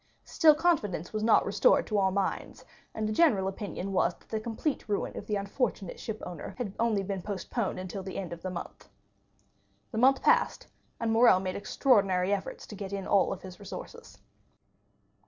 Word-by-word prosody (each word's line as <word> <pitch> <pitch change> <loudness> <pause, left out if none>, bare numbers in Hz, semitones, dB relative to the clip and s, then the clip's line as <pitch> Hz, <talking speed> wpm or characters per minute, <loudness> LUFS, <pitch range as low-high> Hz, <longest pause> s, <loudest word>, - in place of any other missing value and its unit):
Still 310 -2 +5
confidence 215 - 0
was 215 - -1
not 225 +1 +4
restored - - +3
to 210 -2 0
all 190 -1 +3
minds, 195 0 -3 0.3
and 215 -1 -1
the 215 - -1
general 215 - +3
opinion 195 -1 -5
was 185 - +2
that - - -27
the 220 - -1
complete 230 +3 -3
ruin 205 - -1
of - - -7
the 210 - 0
unfortunate 200 -1 -2
shipowner 180 -7 -6
had 220 -6 -4
been 200 -4 0
postponed 200 +2 -3
only - - -4
until 185 +1 -5
the 190 0 -6
end 180 -3 -4
of 170 - -9
the 185 - -4
month. 180 -1 -8 1.0
The 220 - -2
month 265 +2 +4
passed, - - +3 0.3
and 230 -1 0
Morrel 225 -4 +6
made 185 -1 -3
extraordinary 200 -5 +2
efforts 195 - -4
to 210 - -9
get 200 -1 -6
in 195 -1 -3
all 200 - +3
his 185 -1 -11
resources. 335 - -9
200 Hz, 175 wpm, -29 LUFS, 190-225 Hz, 1.0 s, Morrel